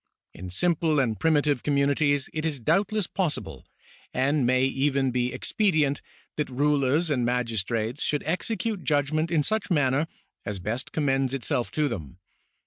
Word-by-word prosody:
In 90 +1 -8
simple 160 - +1
and 115 -6 0
primitive 145 -4 +2
communities 145 0 +2
it 155 - -3
is 155 -4 -1
doubtless 195 - +1
possible, 150 - -3 0.5
and 135 0 +2
may 130 +1 +3
even 135 0 +1
be 125 0 0
ex - - -2
pedient, 155 -9 +2 0.4
that 150 - -1
rulers 145 +3 +1
and 125 -4 +1
magistrates 115 0 -1
should 150 - 0
execute 200 +4 -2
judg 145 -1 +1
ment 155 +2 +1
in 160 -3 +2
such 215 +6 -1
manner 145 -2 +2 0.4
as 100 -1 -4
best 110 +8 -4
commends 135 -3 +1
itself 120 -1 -1
to 150 -1 +1
them. 80 - -6
140 Hz, 150 wpm, -26 LUFS, 125-155 Hz, 0.5 s, may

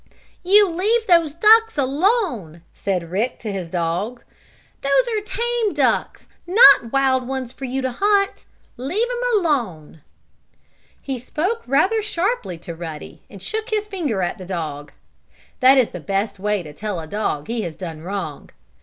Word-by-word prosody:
"You 400 +3 +5
leave 420 +7 +1
those 335 -6 +3
ducks 445 +2 +5
alone!" 275 - 0
said 180 -4 -3
Rick 225 +7 -1
to 215 - -4
his 185 -4 -5
dog. 180 +8 -2 0.6
"Those 275 - +2
are 425 - -1
tame 470 0 -1
ducks, - - 0 0.2
not 360 - +7
wild 265 -2 +2
ones 260 -2 -4
for 270 - -7
you 265 +1 -3
to 260 - -1
hunt. 400 +6 +1 0.3
Leave 325 - -1
'em - - 0
alone!" 215 - -2 1.0
He 265 -2 -4
spoke 360 - -2
rather 370 - +2
sharply 395 - -2
to 175 - -7
Ruddy, 160 -2 -8
and 195 -2 -12
shook 440 +2 -4
his 425 -2 -1
finger 315 - -2
at 175 - -3
the 185 - -8
dog. 155 -5 -5 0.7
That 260 +2 +6
is 250 -4 +3
the 180 - -7
best 200 +3 -2
way 205 -1 -1
to 150 -2 -10
tell 205 +2 -4
a 160 - -6
dog 155 -5 -2
that 230 - -4
he 235 - -1
has 170 -6 -5
done 165 -3 -7
wrong. 180 -5 -5
255 Hz, 165 wpm, -21 LUFS, -, 1.0 s, not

